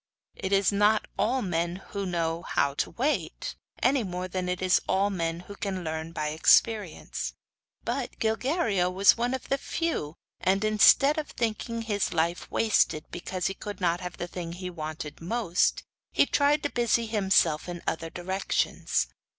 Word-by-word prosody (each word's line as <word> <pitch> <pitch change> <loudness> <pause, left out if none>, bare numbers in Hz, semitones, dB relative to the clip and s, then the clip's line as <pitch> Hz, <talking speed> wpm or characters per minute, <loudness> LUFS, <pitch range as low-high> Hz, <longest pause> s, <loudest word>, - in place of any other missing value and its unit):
It 190 - -4
is 195 0 +4
not 210 +2 +3
all 250 +5 +1
men 170 -2 -1
who 200 -1 -3
know 165 -1 -1
hot 140 -5 0
to - - +1
wait, 240 - -2 0.3
any 265 +1 +4
more 180 -3 -4
than 185 0 -3
it 180 0 -1
is 185 -1 +3
all 195 +2 +2
men 165 -2 -2
who 200 +3 -10
can 190 -2 -3
learn 160 0 -4
by 155 -2 -2
experience; 190 +4 +2 0.5
but - - -3
Gilguerillo 225 - +1
was 195 +2 +5
one 240 +2 0
of 260 - -8
the 275 - +1
few 315 - -2 0.2
and 195 +3 +1
instead 275 +8 +5
of 300 - -5
thinking 230 0 -2
his 205 -3 -1
life 170 +1 0
wasted 210 -8 +2
because 180 +1 -4
he 195 - +1
could 205 +1 -7
not 175 -2 +1
have 180 -1 -6
the - - -3
thing 175 -1 -6
he 180 +1 -6
wanted 155 -2 -6
most, 185 0 +1 0.3
he - - +4
tried 290 +1 +2
to 290 - -1
busy 235 -1 +2
himself 195 -7 +2
in 175 -1 -6
other 165 0 -2
directions. 185 +3 -1
190 Hz, 165 wpm, -27 LUFS, 170-225 Hz, 0.5 s, was